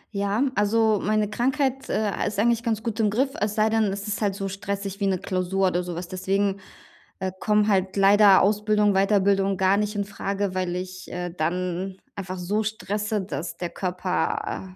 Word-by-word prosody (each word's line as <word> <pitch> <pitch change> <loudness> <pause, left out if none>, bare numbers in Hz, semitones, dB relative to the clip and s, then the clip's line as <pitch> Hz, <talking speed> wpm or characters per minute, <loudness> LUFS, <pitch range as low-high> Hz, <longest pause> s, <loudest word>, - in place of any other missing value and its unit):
Ja, 200 +4 +1
also 215 0 +2
meine 215 0 +1
Krankheit, 265 +4 -1
äh, 210 -2 0
ist 205 - -4
eigentlich 235 +2 +2
ganz 225 -2 -2
gut 230 -1 -3
im 215 - +3
Griff, 260 +6 +1
es 210 0 0
sei 215 0 +3
denn, 225 -1 +3
es 200 +1 -3
ist 210 +1 -3
halt 200 -2 0
so 195 -1 -3
stressig 200 +1 -4
wie 200 - +1
'ne 190 -1 +1
Klausur 185 +1 0
oder 180 0 0
so 175 -1 -5
was. 175 +1 -5
Deswegen, 195 +2 -1 0.6
äh, 190 0 -2
kommen 210 -1 +2
halt 190 -2 +1
leider 200 0 +6
Ausbildung, 210 0 +2
Weiterbildung 195 0 +2
gar 190 +1 +3
nicht 210 0 -1
infrage, 200 -1 -2
weil 185 -1 -2
ich, 185 0 -6
äh, 180 0 -4
dann 180 +3 -2 0.2
einfach 190 -2 -5
so 200 +5 -1
stresse, 210 0 -2
dass 170 -2 -5
der 175 -1 -4
Körper 185 0 -2
a 185 -1 -6
200 Hz, 185 wpm, -25 LUFS, 185-210 Hz, 0.6 s, leider